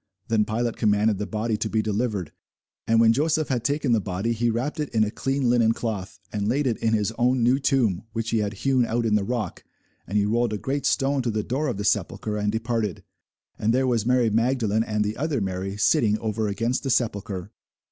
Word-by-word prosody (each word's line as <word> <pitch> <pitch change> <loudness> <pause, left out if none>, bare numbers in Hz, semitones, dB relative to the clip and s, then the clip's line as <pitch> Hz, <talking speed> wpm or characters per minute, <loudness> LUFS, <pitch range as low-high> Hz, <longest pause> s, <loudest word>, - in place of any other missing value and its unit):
Then 110 -2 +3
Pilate 115 +2 -2
commanded 105 -1 +2
the 105 - -3
body 110 0 -1
to 110 +1 -2
be 110 0 0
delivered. 105 -5 -2 0.6
And 115 0 +4
when 115 0 +6
Joseph 155 +3 +1
had 125 -4 0
taken 145 -1 0
the 115 -2 +3
body, 95 +4 -2
he 120 +1 0
wrapped 125 +8 -2
it 150 - -2
in 110 -1 +2
a 105 - -1
clean 135 +1 -1
linen 120 -2 +4
cloth, 105 -5 -4
and 105 -1 -1
laid 140 +6 +1
it 120 -4 +1
in 115 0 +1
his 105 0 0
own 125 0 +2
new 125 +3 +3
tomb, 120 - +1
which 115 0 -3
he 115 - +2
had 105 0 -1
hewn 130 -2 +3
out 115 0 -1
in 110 - +1
the 105 -1 +3
rock: 110 -4 -3 0.4
and 105 - -1
he 100 - +3
rolled 115 +1 +1
a - - -1
great 140 +6 -2
stone 135 0 +1
to 125 - -1
the 110 -1 -1
door 135 +7 -1
of 125 - -2
the 105 - -3
sepulchre, 105 +1 0
and 105 0 0
departed. 110 -4 -2 0.6
And 115 +3 +2
there 130 +1 +2
was 120 -4 +1
Mary 125 -1 +2
Magdalene, 115 -1 +1
and 105 -1 -1
the 105 +1 -3
other 150 -2 -1
Mary, 95 0 -3
sitting 110 -2 +3
over 110 0 -2
against 115 +5 -1
the 135 - -3
sepulchre. 100 -5 -1
115 Hz, 225 wpm, -25 LUFS, 105-125 Hz, 0.6 s, when